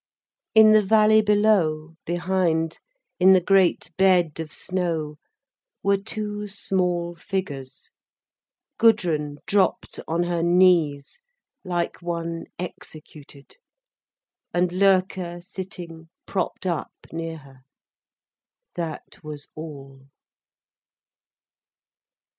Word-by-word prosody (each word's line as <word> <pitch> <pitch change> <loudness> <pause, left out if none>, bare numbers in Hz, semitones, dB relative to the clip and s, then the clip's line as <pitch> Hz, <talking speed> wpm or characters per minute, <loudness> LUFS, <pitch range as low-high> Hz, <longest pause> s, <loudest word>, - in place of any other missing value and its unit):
In 220 0 +8
the 215 0 +6
valley 215 +1 +5
below, 200 -7 +2
behind, 175 -2 0 0.4
in 190 +1 +7
the 185 - +6
great 185 -3 +2
bed 180 -5 +3
of 160 -2 -5
snow, 165 -5 -3 0.6
were 200 0 +3
two 210 0 -4
small 180 -3 -1
figures: 145 -9 -6 0.9
Gudrun 165 -10 +2
dropped 200 -1 0
on 170 +2 0
her 175 -1 -1
knees, 170 - +3 0.4
like 175 -3 -3
one 170 -1 -4
executed, 155 - -10 1.0
and 175 0 +2
Loerke 185 -2 +1
sitting 175 -4 -8 0.2
propped 190 - -3
up 170 -4 -2 0.2
near 165 0 -5
her. 135 -3 -17 1.1
That 165 -1 -6
was 150 -2 -7
all. 135 -4 -10
175 Hz, 90 wpm, -24 LUFS, 160-190 Hz, 1.1 s, In